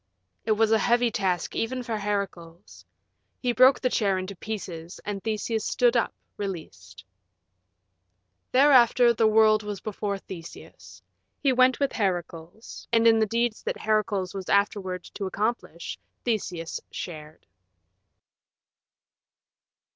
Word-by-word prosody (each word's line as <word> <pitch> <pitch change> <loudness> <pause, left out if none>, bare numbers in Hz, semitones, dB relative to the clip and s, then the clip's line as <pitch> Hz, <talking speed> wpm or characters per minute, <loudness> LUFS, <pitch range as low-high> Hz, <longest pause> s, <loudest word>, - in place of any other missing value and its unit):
It 220 - +4
was 220 +1 +2
a 220 - +4
heavy 240 +2 +2
task 190 -6 -1
even 250 +2 -2
for 230 -2 -3
Heracles. 200 -4 -5 0.6
He 250 - 0
broke 255 +3 +6
the 255 - +1
chair 200 -4 +1
in 185 - -3
pieces, 185 -4 -7
and 200 -2 -4
Theseus 220 0 -2
stood 245 0 +2
up, 235 - +2 0.3
released. 95 - -7 1.5
Thereafter 250 -3 +5
the 225 -1 +3
world 215 0 +5
was 210 -2 -5
before 205 -1 -3
Theseus. 175 -3 -12 0.4
He 275 -3 +2
went 255 +1 +4
with 280 -1 +1
Heracles, 175 0 -4
and 230 -1 +3
in 225 -1 +6
the 220 - +2
deeds 230 +1 -1
that - - -3
Heracles 205 -4 0
was 195 -2 -6
afterward 195 -3 0
to 200 - -7
accomplish 205 -4 -3 0.3
Theseus 180 -8 -2
shared. 155 -2 -8
210 Hz, 125 wpm, -26 LUFS, 185-230 Hz, 1.5 s, broke